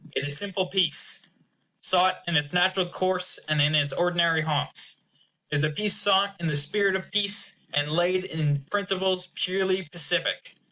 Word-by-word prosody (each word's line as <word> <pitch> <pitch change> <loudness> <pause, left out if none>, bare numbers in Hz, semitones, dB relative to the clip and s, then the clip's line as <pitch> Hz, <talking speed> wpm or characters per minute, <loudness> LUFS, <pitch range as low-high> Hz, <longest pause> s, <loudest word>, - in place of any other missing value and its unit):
It 140 - -3
is 145 - +1
simple 195 +2 0
peace; 180 -6 +2 0.6
sought 185 0 +2
in 170 -1 -2
its 145 +1 0
natural 185 +1 +1
course, 185 0 0
and 155 -1 +1
in 150 +2 +2
its 145 -2 +1
ordinary 170 -2 +1
haunts. 155 -2 -1 0.5
It 150 -1 0
is 155 0 -1
peace 210 +2 +2
sought 200 0 +3
in 170 - -3
the 150 - -1
spirit 190 +7 +1
of 190 - -6
peace, 205 0 +2
and 145 0 -1
laid 175 +3 0
in 150 -6 -2
principles 190 -2 -1
purely 190 0 -1
pacific. 170 -3 0
180 Hz, 160 wpm, -25 LUFS, 155-190 Hz, 0.6 s, sought